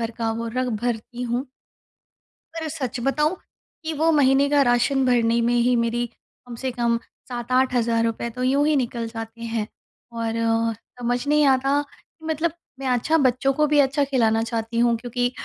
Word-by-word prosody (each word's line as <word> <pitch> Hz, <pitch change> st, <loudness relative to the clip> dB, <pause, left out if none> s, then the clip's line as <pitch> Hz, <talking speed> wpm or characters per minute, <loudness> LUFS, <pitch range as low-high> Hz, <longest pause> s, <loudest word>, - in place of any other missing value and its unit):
भर 230 Hz, 0 st, -2 dB
का 225 Hz, -1 st, 0 dB
वो 230 Hz, +1 st, -4 dB
रग 255 Hz, 0 st, 0 dB
भरती 240 Hz, +1 st, -3 dB
हूँ। 245 Hz, +3 st, -2 dB, 1.1 s
पर 325 Hz, -1 st, -4 dB
सच 255 Hz, -2 st, -3 dB
बताऊँ 300 Hz, +5 st, +1 dB, 0.5 s
कि 320 Hz, 0 st, -3 dB
वो 320 Hz, +2 st, +2 dB
महीने 280 Hz, -1 st, +4 dB
का 290 Hz, -1 st, +4 dB
राशन 255 Hz, +2 st, +2 dB
भरने 235 Hz, -1 st, +3 dB
में 235 Hz, +1 st, +2 dB
ही 245 Hz, +1 st, +3 dB
मेरी 235 Hz, +1 st, 0 dB, 0.4 s
कम 240 Hz, -, -7 dB
से 260 Hz, -1 st, -1 dB
कम 235 Hz, -1 st, +1 dB, 0.3 s
7000-8000 245 Hz, -2 st, +1 dB
रुपए 230 Hz, +1 st, -2 dB
तो 250 Hz, +2 st, -5 dB
यूँ 280 Hz, +3 st, +3 dB
ही 310 Hz, -, +3 dB
निकल 235 Hz, -3 st, -1 dB
जाते 225 Hz, 0 st, -8 dB
हैं। 225 Hz, -2 st, -2 dB, 0.5 s
और 230 Hz, -1 st, -2 dB
अ, 230 Hz, 0 st, +1 dB, 0.3 s
समझ 245 Hz, +3 st, -1 dB
नहीं 300 Hz, 0 st, +4 dB
आता 270 Hz, +2 st, +3 dB
कि 320 Hz, -, -20 dB
मतलब 320 Hz, +1 st, 0 dB, 0.3 s
मैं 270 Hz, -, -3 dB
अच्छा 255 Hz, +6 st, +2 dB
बच्चों 270 Hz, 0 st, +2 dB
को 300 Hz, +2 st, +2 dB
भी 295 Hz, 0 st, +3 dB
अच्छा 280 Hz, +1 st, +3 dB
खिलाना 230 Hz, -5 st, +2 dB
चाहती 230 Hz, 0 st, -3 dB
हूँ। 235 Hz, -1 st, +4 dB
क्योंकि 245 Hz, +1 st, -2 dB
245 Hz, 180 wpm, -23 LUFS, 230-275 Hz, 1.1 s, महीने